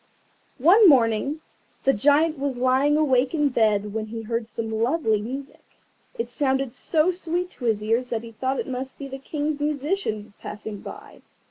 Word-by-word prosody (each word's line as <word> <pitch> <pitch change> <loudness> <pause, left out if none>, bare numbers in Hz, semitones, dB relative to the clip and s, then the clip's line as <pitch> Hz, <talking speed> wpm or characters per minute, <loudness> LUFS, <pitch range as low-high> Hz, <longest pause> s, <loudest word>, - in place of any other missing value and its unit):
One 365 - +7
morning 260 +3 +2 0.4
the 270 - +4
Giant 295 +6 +3
was 275 -2 -2
lying 260 +4 +3
awake 265 -2 +2
in 295 -2 +2
bed 210 -4 +1
when 220 0 -3
he 225 +1 -6
heard 230 0 -3
some 225 0 -5
lovely 225 -1 +1
music. 270 +5 -7 0.6
It 460 - -2
sounded 270 -3 0
so 315 +5 +1
sweet 355 0 -3
to 245 - -8
his 215 -2 +1
ears 230 +3 0
that 230 -1 -2
he 230 - -9
thought 260 +5 -2
it - - -3
must 260 0 -5
be 280 - -6
the 270 0 -7
King's 295 +1 -3
musicians 290 - -2
passing 210 -1 -7
by. - - -11
265 Hz, 170 wpm, -24 LUFS, 225-295 Hz, 0.6 s, One